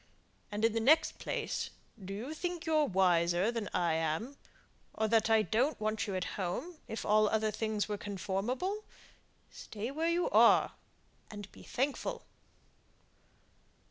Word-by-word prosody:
And 210 +2 0
in 225 - +2
the 225 - +1
next 300 +8 +4
place, - - -3 0.3
do 190 - -7
you 230 +10 -5
think 350 +1 -4
you're 310 -2 +3
wiser 180 +1 +3
than 230 -4 -3
I 170 -2 +1
am; 160 - -1 0.6
or 220 - +1
that 225 0 +3
I 220 -1 +5
don't 250 +8 +1
want 215 +1 -1
you 195 - -3
at 185 - -1 0.2
home, 310 - -3
if 220 - -5
all 215 0 +4
other 220 0 +1
things 215 -1 -1
were 210 -1 -3
conformable? 210 - -2 0.7
Stay 220 +4 -6
where 320 +4 0
you 345 +1 +1
are, - - +6 0.6
and 205 -2 -9
be - - -14
thankful." 270 +3 -2
220 Hz, 145 wpm, -32 LUFS, 200-275 Hz, 0.7 s, are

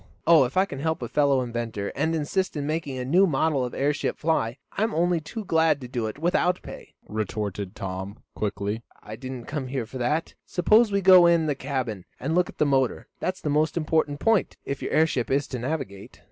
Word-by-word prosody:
"Oh 165 -5 +7
if 130 +8 -5
I 190 - +5
can 140 -8 -7
help 160 -2 -1
a - - -3
fellow 140 0 +2
inventor, 115 -4 -3
and 160 +3 0
assist 165 +3 -1
in 145 - -2
making 150 -3 -2
a 125 - -3
new 180 +9 +4
model 150 -2 +1
of 125 - -4
airship 145 +2 0
fly, 135 -7 0
I'm 220 +2 -1
only 175 +1 +2
too 210 +8 -7
glad 160 -4 +3
to 125 - -6
do 120 -3 -2
it 110 - -6
without 175 +3 +1
pay," - - -11
retorted 105 -2 -3
Tom, 95 +2 -5 0.2
quickly. 105 +1 -3 0.2
"I 110 - -7
didn't 130 0 -7
come 145 -3 -4
here 130 -2 -3
for 130 +3 -8
that. 150 +7 -1
Suppose 215 +5 +3
we 200 0 +1
go 185 -2 +8
in 170 -2 +4
the 150 - +1
cabin, 130 -8 -4
and 150 +5 -2
look 180 +1 +2
at - - -12
the 150 - +3
motor. 135 -3 +1
That's 185 0 -3
the 150 - -1
most 155 +2 +1
important 155 -2 0
point, 225 -4 +2
if 140 - -4
your - - -3
airship 155 -6 +2
is 140 +1 +1
to 125 - -4
navigate." 125 -7 -5
145 Hz, 215 wpm, -25 LUFS, 120-165 Hz, 0.2 s, go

